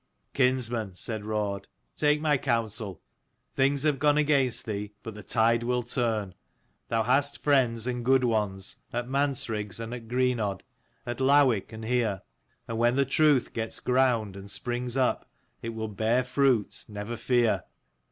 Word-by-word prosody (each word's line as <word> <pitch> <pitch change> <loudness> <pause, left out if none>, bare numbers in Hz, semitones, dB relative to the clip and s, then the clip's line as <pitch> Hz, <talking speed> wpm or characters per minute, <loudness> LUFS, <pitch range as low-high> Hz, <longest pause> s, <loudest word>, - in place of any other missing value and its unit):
" - - -47
Kinsman," 120 -6 +1
said 105 +3 -5
Raud, 105 -2 -2
" - - -47
take 150 0 +3
my 150 -1 +2
counsel. 115 - -2 0.5
Things 135 +1 +2
have 150 -3 +2
gone 145 0 +3
against 140 -5 +2
thee, 105 -1 -4
but 115 - -6
the 105 - -9
tide 115 +3 +2
will 125 +1 0
turn. 115 -5 -1 0.5
Thou 115 -1 +1
hast 135 +5 +1
friends, 125 -6 +2
and 125 -1 -2
good 130 +1 +4
ones, 105 -5 -1
at 120 +1 -3
Mansriggs 120 -7 -1
and 115 +1 -5
at 120 -2 -7
Greenodd, 120 -5 0 0.4
at 120 -1 -4
Lowick 130 -7 +4
and 110 0 -7
here; 115 -5 0 0.4
and 115 -1 -3
when 120 +1 +3
the 140 0 +3
truth 140 -1 +3
gets 115 -1 -3
ground 125 -6 +1
and 100 +1 -9
springs 120 +2 -3
up, 130 -2 +1 0.3
it 115 - -4
will 110 -1 -4
bear 110 +4 +1
fruit, 125 -4 +1
never 105 +3 -5
fear. 120 0 +1
120 Hz, 160 wpm, -28 LUFS, 110-130 Hz, 0.5 s, good